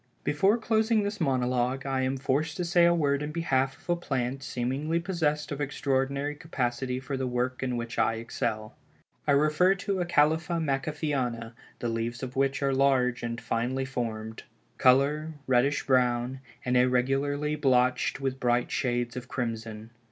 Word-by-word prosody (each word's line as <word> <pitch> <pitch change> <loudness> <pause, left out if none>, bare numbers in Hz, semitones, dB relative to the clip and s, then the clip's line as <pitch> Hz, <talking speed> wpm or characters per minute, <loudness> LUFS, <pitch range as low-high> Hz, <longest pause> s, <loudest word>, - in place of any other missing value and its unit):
Before 190 +10 +3
closing 220 -1 +2
this 205 -1 -3
monologue, 130 -1 0
I 135 -1 0
am 130 +1 0
forced 145 +4 -1
to 180 - -1
say 175 0 +4
a 170 - +5
word 140 -3 +1
in 150 0 -3
behalf 135 -5 0
of - - -23
a 175 - +2
plant 135 -5 -2
seemingly 135 +5 -1
possessed 160 -5 -1
of 145 0 -3
extraordinary 140 0 -1
capacity 130 -5 -2
for 135 +1 -4
the 130 -1 -2
work 125 +1 -1
in 125 -2 -1
which 115 -1 -4
I 115 - +2
excel. 110 -1 -3 0.5
I 145 - +5
refer 155 +6 +4
to 195 0 -2
Acalypha 165 0 +2
Macaffeana, 135 -5 -2 0.2
the 120 - -2
leaves 115 +2 -3
of 130 0 -5
which 135 +1 +1
are 135 0 +2
large 130 -2 +2
and 115 0 -3
finely 125 +4 -1
formed; 110 -4 -4 0.4
color, 145 +5 +3
reddish 130 +3 +2
brown, 125 0 +1 0.3
and 125 0 +1
irregularly 135 +4 +2
blotched 125 -3 +2
with 135 -1 -2
bright 120 -1 +1
shades 120 -2 -1
of 125 -1 -6
crimson. 115 -3 -4
135 Hz, 160 wpm, -28 LUFS, 125-150 Hz, 0.5 s, a